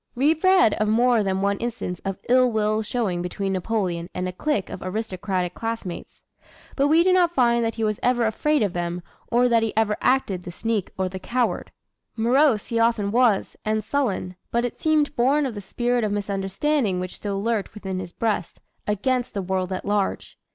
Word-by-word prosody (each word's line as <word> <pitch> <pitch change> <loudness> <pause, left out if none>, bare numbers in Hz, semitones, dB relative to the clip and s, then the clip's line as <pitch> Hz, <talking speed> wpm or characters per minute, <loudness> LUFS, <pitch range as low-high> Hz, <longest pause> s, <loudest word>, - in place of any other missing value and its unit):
We 280 +6 +4
read 370 - +4
of 215 - 0
more 235 +1 +3
than 190 -1 -1
one 200 0 +1
instance 225 -7 -4
of 195 -1 -5
ill 255 0 +4
will 215 0 +1
showing 210 -6 -1
between 195 +2 -3
Napoleon 185 -3 -2
and 180 0 -2
a - - -3
clique 210 -1 -1
of - - -7
aristocratic 185 -2 -2
classmates. 225 -6 -6 0.5
But 280 0 +3
we 320 +3 +5
do 370 +1 +4
not 350 -2 +3
find 235 -2 +3
that 225 -1 -1
he 225 - -2
was 215 -1 0
ever 245 -1 +2
afraid 295 +5 +1
of 200 -4 -1
them 175 0 -3 0.3
or 245 +1 +4
that 230 -2 +3
he 225 -1 -2
ever 215 -1 +2
acted 250 -8 +1
the 175 - -8
sneak 220 +1 -2
or 190 0 0
the 190 +1 -6
coward. 245 +5 -1 0.4
Morose 240 +1 +3
he 230 - 0
often 230 -3 +2
was, 235 -3 +2
and 215 0 0
sullen, 205 -10 -1
but 235 +1 0
it 245 - -6
seemed 305 -2 +2
born 275 +5 +3
of 255 - -3
the 205 - -6
spirit 240 +4 -1
of 210 - 0
misunderstanding 200 +3 0
which 185 0 -5
still 200 -1 -3
lurked 225 -3 -1
within 190 -3 -4
his 175 -2 -7
breast, 210 -3 -2 0.3
against 245 +4 0
the 200 - -1
world 185 0 -2
at 185 - -4
large. 205 -1 -1
220 Hz, 195 wpm, -24 LUFS, 190-245 Hz, 0.5 s, we